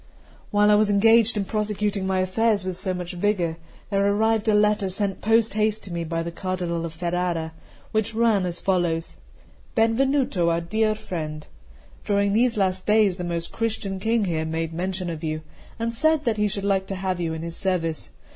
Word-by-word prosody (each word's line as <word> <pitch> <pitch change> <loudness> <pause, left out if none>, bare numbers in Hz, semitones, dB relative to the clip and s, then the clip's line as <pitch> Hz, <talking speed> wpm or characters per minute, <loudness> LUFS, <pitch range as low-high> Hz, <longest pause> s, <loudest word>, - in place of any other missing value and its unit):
CI - - -28
WHILE 210 0 +4
I - - +6
was 210 0 +4
engaged 225 +2 +4
in 200 - 0
prosecuting 210 -2 -1
my 190 -1 +1
affairs 200 +1 +1
with 185 -1 -3
so 185 +1 -3
much 180 -1 -4
vigour, 175 -3 0 0.3
there 195 0 +2
arrived 220 +2 +2
a 210 - +4
letter 210 -2 +2
sent 195 +1 -1
post 225 0 +3
haste 215 0 +1
to 185 - -7
me 170 0 -2
by 165 0 -2
the 170 - -5
Cardinal 175 -2 -3
of 160 - -10
Ferrara, 170 -1 -2 0.4
which 220 0 0
ran 220 -5 +3
as 175 0 -1
follows: 175 -4 0 0.6
'"Benvenuto, 230 -5 +2
our 165 0 +1
dear 215 +5 0
friend, 155 -8 -5 0.6
During 200 -1 +1
these 235 +1 +2
last 185 -2 0
days 210 -3 +4
the 180 - -4
most 170 -1 -3
Christian 215 -4 -2
King 225 +1 +1
here 165 -3 -1
made 160 +1 -3
mention 185 +2 -2
of 165 -1 -5
you, 155 0 -2 0.4
and 230 0 -2
said 315 +4 +2
that 225 -3 +1
he 210 0 +2
should 200 -1 -4
like 195 -1 +1
to 195 - -3
have 185 -1 -2
you 165 -2 -2
in 160 - -6
his 170 0 -5
service. 170 -5 -1
195 Hz, 195 wpm, -24 LUFS, 175-215 Hz, 0.6 s, I